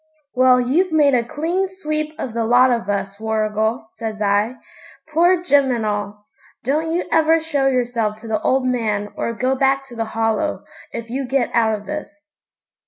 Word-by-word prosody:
'Well, 255 -1 +5
you've 310 +9 +1
made 295 -3 +4
a 240 -2 +3
clean 335 +10 -1
sweep 310 -4 -4
of 240 - -5
the 230 0 -1
lot 245 +3 +5
of 230 -5 -1
us, 200 0 -2
Warrigal,' 220 +1 -1
says 220 -2 -5
I, 205 +3 +1 0.6
'poor 350 +2 +4
Jim 285 -6 +3
and 235 -3 -1
all. 205 0 -3 0.4
Don't 305 +6 0
you 345 +2 0
ever 325 0 +4
show 295 -4 0
yourself 240 -4 0
to 230 - -9
the 220 -1 -1
old 260 0 +1
man 215 -5 -1
or - - -2
go 255 +3 0
back 270 0 +1
to 240 - -10
the 225 -1 -2
Hollow, 225 +7 0 0.3
if 230 0 -7
you 265 +1 -3
get 265 -1 0
out 225 -2 +3
of 210 0 -9
this.' 300 0 -8
250 Hz, 180 wpm, -20 LUFS, 220-300 Hz, 0.6 s, Well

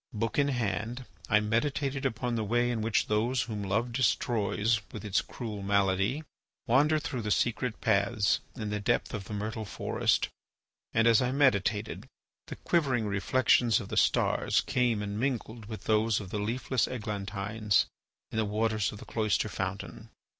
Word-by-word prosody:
Book 115 +4 -1
in 140 - +4
hand, 120 0 -2 0.2
I 105 -2 +5
meditated 135 +5 0
upon 120 0 -3
the 115 -2 0
way 120 +3 +1
in 115 -2 -2
which 110 -1 +1
those 115 +4 +1
whom 110 -3 -5
Love 105 +5 -1
destroys 115 -3 +1
with - - -7
its 100 -2 +2
cruel 110 -5 -6
malady 100 +7 +1 0.4
wander 145 +5 +4
through 130 -5 -3
the 105 - -3
secret 120 +2 0
paths 100 -1 +2 0.2
in 110 -4 -4
the 105 - -1
depth 120 +5 0
of 105 -4 -4
the 105 - -6
myrtle 110 +2 -3
forest, 105 - 0 0.6
and, 115 +1 +3
as 115 0 +6
I 125 0 +1
meditated, 110 -6 +1 0.4
the - - -6
quivering 135 -9 +1
reflections 115 +2 +3
of - - -8
the - - -4
stars - - +2
came 125 -6 +1
and 100 +1 -4
mingled 120 -3 -2
with 110 -1 -7
those 110 0 +2
of 95 -3 -8
the 105 - -2
leafless 120 +4 0
eglantines 105 -2 -1 0.5
in 110 - -1
the - - +3
waters 110 -1 0
of 105 - -9
the - - -11
cloister 110 -1 0
fountain. 100 +4 -5
110 Hz, 165 wpm, -29 LUFS, 105-120 Hz, 0.6 s, as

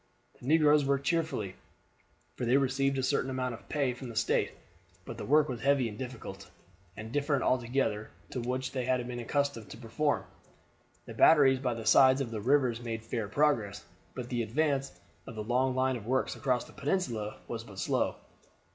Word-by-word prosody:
The 125 - -10
negroes 150 -1 +5
worked 140 0 0
cheerfully, 160 - -1 0.8
for - - -5
they 120 +3 +4
received 135 0 +1
a 130 - -1
certain 130 - +1
amount 130 -1 -2
of 115 - -12
pay 140 -4 0
from 125 0 -8
the 115 - -9
State; 115 - +1 0.6
but - - -8
the - - -5
work 150 +1 +4
was 125 -3 -5
heavy 135 -2 +3
and 105 - -7
difficult, 105 -6 -8 0.5
and 110 +1 -7
different 145 0 0
altogether 120 -4 0 0.2
to 130 - -3
that 120 +1 -4
which 130 +1 -2
they 130 -2 -3
were 125 -1 -1
accustomed 140 -2 -1
to - - -9
perform. 120 -2 -1 0.8
The - - -8
batteries 135 -5 +6
by 125 -3 -1
the 115 -1 -7
sides 130 +4 +6
of 130 -4 -3
the 110 -2 -4
rivers 125 -1 +2
made 115 -2 -4
fair 115 -2 -3
progress, 110 -5 +1 0.3
but 125 -2 -5
the 120 -2 -1
advance 135 +3 0 0.4
of 115 - -8
the 110 - -4
long 125 +3 +1
line 130 0 +1
of 110 -1 -10
works 130 +1 0
across 125 -3 0
the - - -15
peninsula 125 - -2
was - - -5
but - - -13
slow. - - 0
130 Hz, 190 wpm, -30 LUFS, 115-140 Hz, 0.8 s, batteries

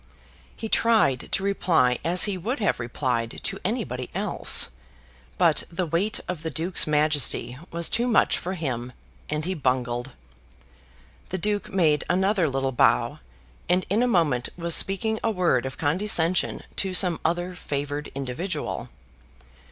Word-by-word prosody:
He 225 - -5
tried 220 - +2
to 195 - 0
reply 165 -10 +2
as 175 +2 +3
he 205 -2 +2
would 220 - -3
have 205 - 0
replied 120 -1 -2
to - - -3
anybody - - -3
else, - - +4 0.7
but - - +3
the 175 +2 -2
weight 175 +7 0
of 180 -4 -4
the 160 - -3
Duke's 165 +2 -1
majesty 150 -4 +1
was 170 0 0
too 240 +1 0
much 235 - +3
for 185 - -4
him, 125 -7 -4 0.4
and 150 +1 -2
he 185 - -1
bungled. 125 -4 -2 1.2
The 190 - -3
Duke 205 +3 -2
made 155 -6 +2
another 190 -2 +2
little 135 0 -1
bow, 90 - +2 0.5
and 180 +1 +3
in 215 +4 +3
a 250 - +3
moment 155 - +1
was 170 -1 +1
speaking 215 +5 +2
a 230 - +2
word 175 - +1
of 130 - -8
condescension 175 +2 +1
to 190 -1 -1
some 180 -3 +5
other 175 +2 -1
favoured 145 -3 -4
individual. 140 +8 -4
170 Hz, 145 wpm, -25 LUFS, 135-190 Hz, 1.2 s, some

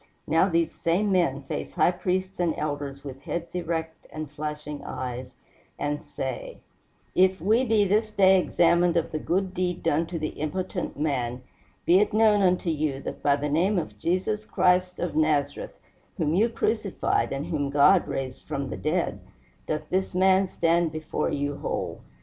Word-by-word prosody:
Now 165 +4 +3
these 165 -2 +1
same 190 +5 0
men 140 -7 +1
face - - -5
high - - +4
priests 185 +1 -2
and 170 -3 +1
elders 145 -2 -4
with 135 -1 -8
heads 170 +2 -5
erect 165 -2 -4
and 155 -2 -6
flashing 150 0 -5
eyes, 125 0 -5 0.4
and 145 0 -2
say: - - -5 0.6
"If 185 0 +3
we 215 +9 +3
be 215 -3 +3
this 215 +3 +2
day 190 -2 +5
examined 175 0 +3
of 165 - -1
the 155 - -2
good 185 +3 -1
deed 180 -1 -2
done 160 +3 +1
to 170 - -4
the 155 -1 -2
impotent 180 +2 -4
man, 125 -5 -1 0.4
be 180 +2 +6
it 210 +1 +1
known 215 -1 +4
unto 180 -2 +2
you 150 -3 -1
that - - -6
by 140 -1 +3
the 145 +1 -2
name 175 +8 +2
of 105 -11 -4
Jesus 190 - 0
Christ 180 -3 +2
of 175 -3 -3
Nazareth, 150 -2 0 0.4
whom 155 -1 0
you 215 +7 +3
crucified 220 -3 0
and 135 +2 -3
whom 150 -5 -2
God 145 +6 +5
raised 130 -1 -4
from 140 -3 -3
the - - -4
dead, 165 +3 -1 0.5
doth 155 0 -2
this 190 0 -1
man 190 +1 +4
stand 170 -1 +1
before 155 0 -2
you 145 0 -2
whole. - - -4
170 Hz, 170 wpm, -26 LUFS, 150-185 Hz, 0.6 s, be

